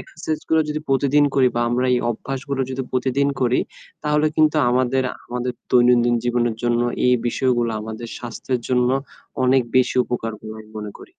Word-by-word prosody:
Exercise 155 -1 -5
গুলা 160 -1 +4
যদি 150 0 -2
প্রতিদিন 140 +2 +3
করি 130 -2 +5
বা 120 - 0
আমরা 125 +2 +1
এই - - +2
অভ্যাসগুলো 135 +3 -4
যদি 130 0 -3
প্রতিদিন 130 +2 +1
করি 125 0 +2 0.4
তাহলে 150 +1 +2
কিন্তু 155 0 +4
আমাদের, 130 +1 +2 0.2
আমাদের 125 +1 -3 0.2
দৈনন্দিন 120 -1 +4
জীবনের 120 -2 0
জন্য 120 0 +1 0.3
এই 125 - +5
বিষয়গুলো 120 -1 +1
আমাদের 110 +2 -7
স্বাস্থ্যের 120 +1 -4
জন্য 125 -1 +2 0.6
অনেক 130 +1 +4
বেশি 130 -1 +3
উপকার 115 -2 -3
বলে 110 0 -8
আমি 110 - -15
মনে 105 -1 -6
করি। - - -13
125 Hz, 165 wpm, -21 LUFS, 120-135 Hz, 0.6 s, করি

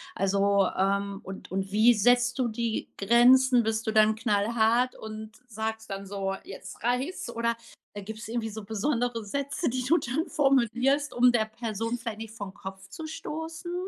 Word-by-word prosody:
also, 200 0 +2
ähm, 200 +1 0
und 190 +1 -9
und 190 +1 -2
wie 220 +4 +6
setzt 245 +4 +3
du 250 - +2
die 230 0 -2
Grenzen? 245 +3 +5
Bist 220 0 -1
du - - +2
dann 215 0 +4
knallhart 225 +3 +1
und 220 0 -8 0.2
sagst 220 0 -4
dann 195 0 -5
so: 195 -1 -3
„Jetzt 190 -1 -10
reichts?“ 250 +6 -1
Oder, 235 0 -1 0.4
äh, 205 - -6
gibt's 220 +2 -7
irgendwie 230 -1 -2
so 215 0 -7
besondere 230 +2 -1
Sätze, 280 - -2
die 255 +1 -2
du 305 +7 +3
dann 310 +5 -2
formulierst, 270 +1 +2
um 245 0 +5
der 220 -2 +2
Person 225 +1 -4
vielleicht 230 -3 -6
nicht 220 -1 -8
vorn 200 -4 -7
Kopf 190 0 -9
zu 315 +10 -8
stoßen? 320 +2 -6
225 Hz, 170 wpm, -27 LUFS, 205-245 Hz, 0.4 s, wie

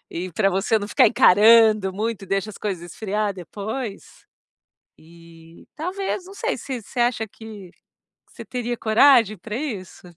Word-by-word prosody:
E 180 +2 -6
pra 195 +3 +2
você 195 +4 +1
não 205 -1 -6
ficar - - +4
encarando 215 -1 +5
muito, 215 0 -4
deixa 195 +2 -1
as 205 - -12
coisas 180 -4 -5
esfriar 210 -1 -2
depois. 205 +5 -7 0.7
Eh, 165 0 -17
talvez, 365 +3 -4
não 385 - -12
sei, 475 +4 -2
se 255 -4 -6
você 240 - -8
acha 235 -2 0
que, 210 -3 -12 0.6
você - - -11
teria 245 -1 -4
coragem 225 -1 +4
pra 210 +5 -6
isso? 215 - -6
215 Hz, 150 wpm, -22 LUFS, 190-235 Hz, 0.7 s, encarando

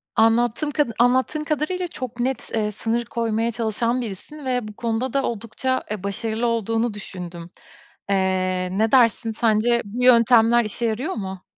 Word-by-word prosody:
Anlattığım 240 +6 +2
kad 295 -3 +1
anlattığın 260 +5 +2
kadarıyla 320 +4 -1
çok 255 -7 -7
net, 260 +2 -2
eee, 210 -1 0
sınır 230 +3 -2
koymaya 230 0 -1
çalışan 230 +2 -1
birisin 250 +7 -8
ve 250 -4 -1
bu 210 - -9
konuda 230 +2 -2
da 275 -1 +1
oldukça 235 +3 -2
e, 210 -3 -4
başarılı 220 +4 -2
olduğunu 225 0 0
düşündüm. 175 -4 -8 0.6
Eee, 185 -1 +1
ne 220 +1 +2
dersin 230 -2 +4
sence 230 +1 +2
bu 235 +5 -4
yöntemler 235 -1 +5
işe 225 +3 -2
yarıyor 230 +6 -1
mu? 190 -3 -6
230 Hz, 150 wpm, -22 LUFS, 215-250 Hz, 0.6 s, yöntemler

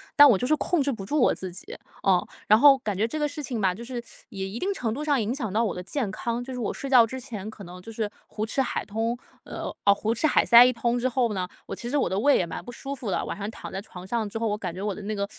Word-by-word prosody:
但 290 -1 +10
我 245 - +6
就 250 - -1
是 310 - +4
控 340 +1 0
制 280 0 +1
不 210 -6 -6
住 295 +8 +1
我 - - +4
自 185 -1 -5
己。 175 - -8 0.2
呃， 185 -2 +2 0.2
然 215 +1 +6
后 275 0 +7
感 210 -5 -3
觉 220 +3 +2
这 310 +7 -4
个 295 - +1
事 295 +1 -6
情 245 -5 -3
吧， 185 -2 +2
就 235 +4 -8
是 245 -1 -5 0.3
也 190 -1 -4
一 195 +4 -6
定 390 +9 -1
程 240 - -2
度 290 +7 -4
上 285 -5 +2
影 220 +3 -1
响 220 -9 -4
到 225 +2 +2
我 215 - -1
的 180 - -5
健 225 +3 -2
康。 235 +4 -3
就 260 - -6
是 250 - -5
我 215 - -1
睡 275 - -6
觉 250 -3 +7
之 260 +3 -6
前 220 -6 -7
可 215 -2 -10
能 180 +1 -10
就 225 - -9
是 220 -1 -2 0.2
胡 215 - -4
吃 270 +5 0
海 260 - -2
通 225 +3 -1 0.3
呃， - - -7 0.2
哦， 200 - +7
胡 215 +3 -1
吃 235 - -1
海 310 - +4
塞 235 0 +9
一 250 - +5
通 235 0 0
之 250 +1 +1
后 240 -3 +1
呢， 185 -2 -1 0.2
我 - - -5
其 240 - -6
实 290 - +1
我 280 - +2
的 190 - -2
胃 280 +7 +4
也 180 - +1
蛮 165 - -6
不 245 - -8
舒 275 +3 -6
服 240 -7 -4
的， - - 0
晚 - - -5
上 200 0 -4
躺 - - -8
在 190 - -4
床 185 -3 -11
上 225 +1 -1
之 225 - -5
后， 230 - 0
我 210 -1 -1
感 185 -5 -4
觉 185 - -7
我 205 -1 -2
的 - - -8
那 210 +2 -3
个 200 -1 -2
225 Hz, 345 characters per minute, -26 LUFS, 200-260 Hz, 0.3 s, 但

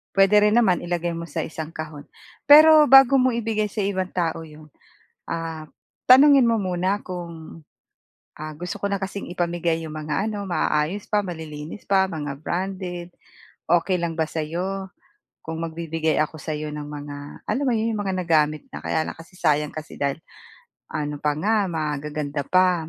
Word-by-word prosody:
Puwede 195 +1 +5
rin 210 - +4
naman, 185 -6 +2
ilagay 175 -1 -2
mo 170 - -5
sa 165 -1 -4
isang 160 0 -6
kahon. 155 -2 -7 0.4
Pero, 305 +1 +9
bago 270 0 +7
mo 255 -1 +3
ibigay 225 -2 -1
sa 210 +1 -5
ibang 190 -2 -1
tao 165 -2 -2
'yon, 155 -1 -14 0.6
ah, 165 -2 -5 0.4
tanungin 270 0 +7
mo 230 - +3
muna 190 0 -1
kung, 170 -3 -8 0.8
ah, 155 +1 -6
"Gusto 170 +3 -6
ko - - -8
na 195 - -1
kasing 195 -1 -5
ipamigay 170 -2 -1
'yong 155 -1 -7
mga 155 +7 -2
ano, 205 -2 -4
maayos 175 +1 -1
pa, 205 -1 +1
malilinis 160 0 -8
pa, 195 -1 +4
mga 150 -6 -4
branded. 180 -1 -4 0.6
Okay 175 +2 +3
lang 170 -2 -2
ba 160 - +2
sa'yo, 180 +5 -4 0.6
kung 160 +1 -5
magbibigay 165 -1 -2
ako 155 0 -1
sa 155 0 -3
'yo 150 0 -5
ng 150 0 -6
mga, 145 -1 -9
alam 285 - -1
mo 260 - +2
'yon, 225 +1 0
'yong 210 - -2
mga 195 -2 -2
nagamit 155 - +2
na? - - -6
Kaya 160 -1 -1
lang - - -5
kasi 165 +3 -15
sayang 150 -2 +1
kasi 155 -1 -9
dahil 140 +1 0 0.7
ano 150 -2 -4
pa 150 -1 0
nga, 205 +3 +1
magaganda 150 -2 -3
pa, 180 +1 +2
170 Hz, 170 wpm, -23 LUFS, 155-195 Hz, 0.8 s, Pero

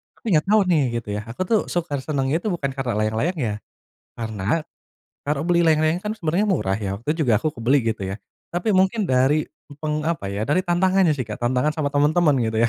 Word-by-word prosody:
Tapi - - -30
nggak 160 - -11
tahu 215 +1 +5
nih, 155 -3 +4 0.2
gitu - - -11
ya, - - -5
aku 120 +11 -3
tuh 215 +3 +2
suka 160 -5 -2
senengnya 140 +2 -1
tuh 190 -2 -2
bukan 140 -4 -2
karena 130 -5 -3
layang-layangnya. 110 - -1 0.5
Karena 110 +5 -2 0.6
kalau 150 +2 -2
beli 175 -1 +3
layang-layang 160 +2 +2
kan 210 - -3
sebenarnya 190 0 0
murah 100 - +1
ya, 100 -2 -3
waktu 120 - -23
itu 160 - -1
juga 115 -7 +3
aku 155 - -2
kebeli, 120 +5 +2 0.2
gitu 100 - -9
ya. 95 +2 -4 0.3
Tapi 180 +5 0
mungkin 190 +2 +2
dari 135 +4 +2 0.3
peng 150 0 -2
apa 160 -7 -2
ya, 105 +5 -3
dari 185 +5 +2
tantangannya 185 -1 +3
sih 140 - -4
kayak 105 - -4
tantangan 130 +5 +1
sama 145 -2 0
teman-teman, 150 +1 +3
gitu 110 0 -1
ya. 115 - +4
150 Hz, 210 wpm, -22 LUFS, 120-175 Hz, 0.6 s, tahu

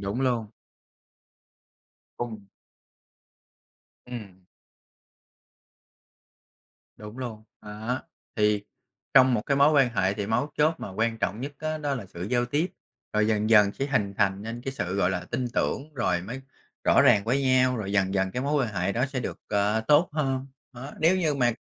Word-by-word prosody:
đúng 100 +6 -3
luôn. 120 -4 +1 1.7
Cùng 110 -4 -5 1.6
Ừm. 100 -7 -9 2.5
Đúng 105 +3 -10
luôn, 115 -4 -6 0.2
đó, 110 +4 -4 0.3
thì 105 -1 +2 0.5
trong 130 -2 +7
một 105 - 0
cái 140 - +2
mối 140 +2 +5
quan 140 -4 +5
hệ 95 0 +1
thì 100 -1 -3
mấu 125 +7 0
chốt 155 +2 +4
mà - - -5
quan 115 +2 -1
trọng 105 +3 -2
nhất 140 +2 -5
á 155 0 -3
đó 145 -2 -1
là 110 -7 -6
sự 85 - -9
giao 120 +5 +1
tiếp, 145 +8 0 0.5
rồi 105 0 +2
dần 110 0 +1
dần 105 -2 +6
sẽ 135 - -3
hình 105 -8 0
thành 100 -1 +1
nên 115 +2 -6
cái 135 - -3
sự, 90 -8 -3
gọi 95 -2 +2
là, 90 -1 -3
tin 130 - -1
tưởng 150 +2 -1
rồi 90 -8 0
mới 125 +8 -6 0.4
rõ - - +5
ràng 100 - +5
với 130 +4 +1
nhau, 130 -1 +3
rồi 100 -3 -4
dần 95 -1 +1
dần 95 -1 +1
cái 125 +6 -3
mối 145 -1 +1
quan 110 - -8
hệ 90 +2 0
đó 125 +5 +1
sẽ 135 -2 -4
được, - - -5
ờ, 105 +2 +1
tốt 150 +4 +5
hơn. 135 -3 -1 0.3
Đó, 130 +3 -9
nếu 170 +4 +4
như 160 -5 +1
mà 120 -3 +2
120 Hz, 175 wpm, -26 LUFS, 105-135 Hz, 2.5 s, trong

